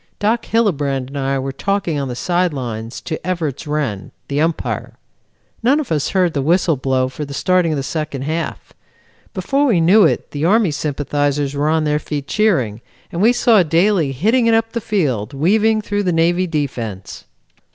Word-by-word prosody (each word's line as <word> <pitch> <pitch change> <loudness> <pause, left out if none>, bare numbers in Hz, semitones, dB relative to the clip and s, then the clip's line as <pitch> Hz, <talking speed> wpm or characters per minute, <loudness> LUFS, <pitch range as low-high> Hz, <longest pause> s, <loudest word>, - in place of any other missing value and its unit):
Doc 225 +3 0
Hillebrand 145 - 0
and 140 - -7
I 135 0 0
were 135 0 -3
talking 180 +1 -1
on 140 - -2
the 125 - -5
side 175 +5 0
lines 115 -2 -5
to 155 - -4
Evarts 160 -6 -3
Wrenn, 140 -10 -2 0.2
the 145 +1 0
Umpire. 165 0 -2 0.6
None 265 +6 +3
of 295 - -5
us 150 -3 0
heard 180 -4 +1
the 140 - -1
whistle 165 +2 +2
blow 130 -1 0
for 130 +3 -6
the 140 -1 -7
starting 180 +1 +2
of - - -2
the 135 - -2
second 150 -2 -4
half. 160 +3 -4 0.6
Before 280 +1 +1
we 210 -9 +3
knew 190 +6 +5
it - - 0
the 145 0 -4
Army 200 +1 +3
sympathizers 145 -1 -1
were 145 +2 0
on 160 0 +2
their 150 0 +1
feet 145 -2 -5
cheering 130 - +1 0.3
and 170 - -3
we 225 +3 +6
saw 240 -4 +4
Daly 170 -1 +2
hitting 220 - +2
it 225 - +4
up 225 0 0
the 235 - -3
field, 145 - -1
weaving 215 +8 +2
through 205 0 -1
the 185 -3 0
Navy 175 +2 +2
defense. 120 - -4
155 Hz, 185 wpm, -18 LUFS, 140-195 Hz, 0.6 s, we